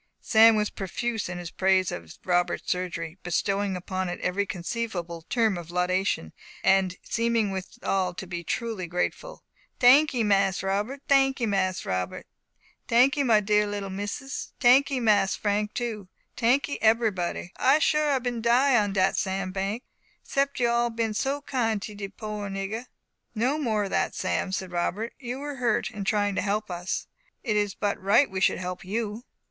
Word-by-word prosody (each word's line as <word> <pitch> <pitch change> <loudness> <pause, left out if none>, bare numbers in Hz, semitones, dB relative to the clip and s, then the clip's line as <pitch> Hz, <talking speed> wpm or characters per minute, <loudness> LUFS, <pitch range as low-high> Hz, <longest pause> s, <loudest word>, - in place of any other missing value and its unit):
Sam 225 0 +6
was 210 -1 0
profuse 220 +2 -3
in 180 - -5
his 175 -1 -7
praise 190 -1 +2
of 85 -2 -8
Robert's 175 -1 0
surgery, 180 -1 -3
bestowing 195 +2 0
upon 185 0 -3
it 175 - -5
every 200 +3 0
conceivable 175 -3 -4
term 220 -6 +2
of 170 -1 -10
laudation, 180 - 0 0.3
and 190 -1 +3
seeming 230 -3 0
withal 190 -1 -2
to 190 - -6
be 175 -1 -5
truly 215 0 -3
grateful. 180 - -3 0.3
"Tankee, 260 0 +5
Mas 195 -2 +2
Robert! 210 +9 -2
Tankee, 270 -3 +3
Mas 190 -3 0
Harold! 90 -1 -3 0.6
Tankee, 265 +5 +4
my 225 -6 +4
dear 210 0 +2
little 205 -1 -4
misses! 205 +8 -5
Tankee, 265 +2 +5
Mas 210 -5 +3
Frank 210 0 -1
too! 225 -5 -3 0.3
Tankee, 280 +6 +1
ebbery 225 0 +4
body! 175 -1 -4
I 270 +3 +4
sure 305 -1 +2
I 275 - +3
bin 245 -2 -3
die 245 +4 +4
on 205 -1 -2
dat 190 0 +2
sand 190 -1 -2
bank, 200 +5 -2 0.4
'sept 275 0 -1
you 240 - +3
all 235 0 +2
bin 225 -1 -2
so 275 +6 -1
kind 225 -6 0
to 210 - -6
de 200 -1 -5
poor 210 0 -6
nigger." 195 +5 -4 0.5
"No 255 +7 +1
more 220 -7 0
of 195 - -4
that, - - 0
Sam," 185 0 -1
said 190 -1 -3
Robert, 190 +6 -2
"you 250 0 -5
were 285 0 -6
hurt 240 -4 0
in 205 -2 -6
trying 205 -2 +1
to - - -1
help 210 0 -1
us; 175 +1 -3 0.4
it 220 -5 0
is 205 -1 0
but 205 -2 -2
right 200 +6 +4
we 190 0 -3
should - - +3
help 180 0 -5
you." 215 +4 -3
210 Hz, 170 wpm, -26 LUFS, 190-235 Hz, 0.6 s, Sam